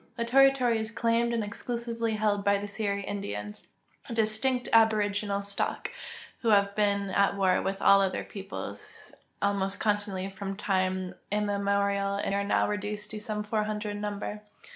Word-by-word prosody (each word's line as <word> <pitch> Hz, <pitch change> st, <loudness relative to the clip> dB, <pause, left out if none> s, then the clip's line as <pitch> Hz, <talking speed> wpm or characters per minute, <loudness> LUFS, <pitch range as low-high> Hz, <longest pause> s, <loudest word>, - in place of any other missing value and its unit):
The 235 Hz, -1 st, -2 dB
territory 255 Hz, -2 st, +4 dB
is 220 Hz, 0 st, -2 dB
claimed 230 Hz, +1 st, +1 dB
and 230 Hz, -2 st, 0 dB
exclusively 230 Hz, +1 st, -2 dB
held 210 Hz, -1 st, +1 dB
by 200 Hz, 0 st, +3 dB
the 205 Hz, +1 st, -5 dB
Seri 200 Hz, -1 st, -2 dB
Indians, 105 Hz, -, -5 dB, 0.4 s
a 230 Hz, -, -4 dB
distinct 225 Hz, +3 st, +1 dB
aboriginal 205 Hz, -2 st, +3 dB
stock, 200 Hz, 0 st, -2 dB, 0.5 s
who 235 Hz, -, -4 dB
have 200 Hz, -1 st, +4 dB
been 200 Hz, -2 st, +1 dB
at 200 Hz, +1 st, +2 dB
war 185 Hz, -2 st, +3 dB
with 195 Hz, 0 st, -3 dB
all 200 Hz, 0 st, +7 dB
other 190 Hz, -1 st, 0 dB
peoples 195 Hz, -1 st, -8 dB, 0.3 s
almost 200 Hz, -1 st, +1 dB
constantly 205 Hz, -3 st, 0 dB
from 195 Hz, 0 st, -5 dB
time 185 Hz, -2 st, 0 dB, 0.2 s
immemorial 200 Hz, -1 st, +1 dB
and 200 Hz, 0 st, -1 dB
are 200 Hz, 0 st, +1 dB
now 200 Hz, -, +2 dB
reduced 210 Hz, 0 st, -3 dB
to 215 Hz, -, -5 dB
some 210 Hz, -1 st, -3 dB
400 210 Hz, 0 st, -2 dB
in 205 Hz, 0 st, -5 dB
numl>er. 210 Hz, 0 st, -4 dB
205 Hz, 155 wpm, -28 LUFS, 200-220 Hz, 0.5 s, all